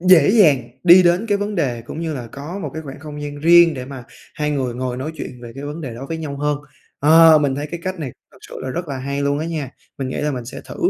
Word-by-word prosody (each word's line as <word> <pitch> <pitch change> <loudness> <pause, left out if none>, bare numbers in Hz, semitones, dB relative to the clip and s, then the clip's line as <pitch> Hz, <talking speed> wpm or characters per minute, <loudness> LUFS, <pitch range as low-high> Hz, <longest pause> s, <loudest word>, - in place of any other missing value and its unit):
dễ 180 -3 +6
dàng 150 - +4 0.2
đi 180 +1 +9
đến 175 +5 +2
cái 205 -2 +1
vấn 205 +1 -3
đề 125 -9 -1
cũng 150 - -7
như 165 -2 -3
là 125 -4 -6
có 145 - -7
một - - -5
cái 160 - -5
khoảng 135 -2 -9
không 150 -1 -8
gian 145 0 -6
riêng 170 0 +6
để 125 -1 -5
mà 130 -2 -9 0.3
hai 150 0 -1
người 130 -4 -1
ngồi 125 0 -3
nói 145 +5 -4
chuyện 125 -5 -8
về 115 - -9
cái 140 - -7
vấn 150 +3 -6
đề 125 -6 -6
đó 135 +4 -7
với 165 - -3
nhau 145 -3 -5
hơn. 145 0 -1 0.4
Ờ, 160 +1 +7
mình 140 -3 +1
thấy 145 +2 -4
cái 170 0 -5
cách 185 -1 -4
này 140 -6 -5 0.2
thật - - -19
sự - - -12
là 130 - -4
rất 175 +3 -4
là 135 -2 -4
hay 140 +2 -3
luôn 140 0 +1
á 160 - -3
nha, 155 -6 -4 0.3
mình 130 -1 -3
nghĩ - - -4
là 150 0 0
mình 125 -3 -4
sẽ 120 - -8
thử, - - -9
145 Hz, 290 wpm, -20 LUFS, 135-165 Hz, 0.4 s, đi